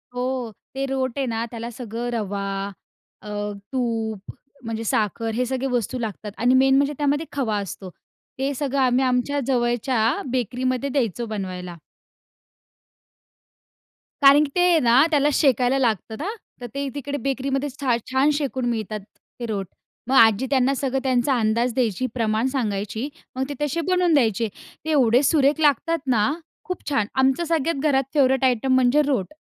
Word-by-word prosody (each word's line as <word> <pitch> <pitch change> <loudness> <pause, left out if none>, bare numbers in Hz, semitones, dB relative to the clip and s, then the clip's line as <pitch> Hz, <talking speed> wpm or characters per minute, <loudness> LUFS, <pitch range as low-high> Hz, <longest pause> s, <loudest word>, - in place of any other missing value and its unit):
हो. 250 -2 -2 0.2
ते 270 +1 -2
रोट 265 -2 -2
आहे 275 - 0
ना 230 -1 -2
त्याला 230 0 -5
सगळं 235 0 -5
रवा, 205 -3 -2 0.8
अ, 210 - -10 0.4
तूप 225 -5 -2 0.3
म्हणजे 225 -1 -4
साखर 225 +1 -1
हे 250 +3 0
सगळे 260 +1 -2
वस्तू 245 +1 -1
लागतात 215 -2 -5
आणि 245 +2 +3
मेन 265 +1 +5
म्हणजे 285 +1 +2
त्यामध्ये 290 +2 0
खवा 235 -7 -1
असतो. 195 -1 -6 0.5
ते 275 +1 0
सगळं 280 0 -1
आम्ही 255 0 +3
आमच्या 255 +3 +1
जवळच्या 240 -1 +1 0.3
बेकरीमध्ये 255 +2 -1
द्यायचो 240 - -1
बनवायला. 180 -3 -5 2.5
कारण 280 +1 +7
की - - -7
ते 355 -2 +4
ना, 245 0 +5
त्याला 295 -1 +3
शेकायला 260 -2 +3
लागतं 225 -3 0
ना 345 - -3 0.3
तर - - -5
ते 280 0 -2
तिकडे 285 0 -3
बेकरीमध्ये 275 +1 -2
छा 255 -4 +2 0.2
छान 265 +3 +3
शेकून 275 -3 -2
मिळतात 215 -2 -3 0.2
ते 240 - -10
रोट. 205 -4 -3 0.4
मग 265 - +1
आजी 225 0 +6
त्यांना 265 -1 +3
सगळं 270 0 -1
त्यांचा 260 0 +2
अंदाज 230 +2 +1
द्यायची. 240 -2 0
प्रमाण 225 0 0
सांगायची. 225 -1 -2 0.3
मग 260 - -1
ते - - -3
तशे 295 +3 0
बनवून 360 -2 +3
द्यायचे. 230 -5 +2 0.4
ते - - -3
एवढे 250 -4 +4
सुरेख 290 +1 +3
लागतात 320 +3 +2 0.2
ना, 210 +6 +2 0.3
खूप 365 -3 -5
छान! 220 -8 +1
आमचं 265 +5 +2
सगळ्यात 330 -2 0
घरात 270 -1 +3
फेवरेट 265 -3 +3
आयटम 260 +1 +2
म्हणजे 260 +3 +4
रोट. 255 -5 -1
255 Hz, 155 wpm, -23 LUFS, 230-275 Hz, 2.5 s, कारण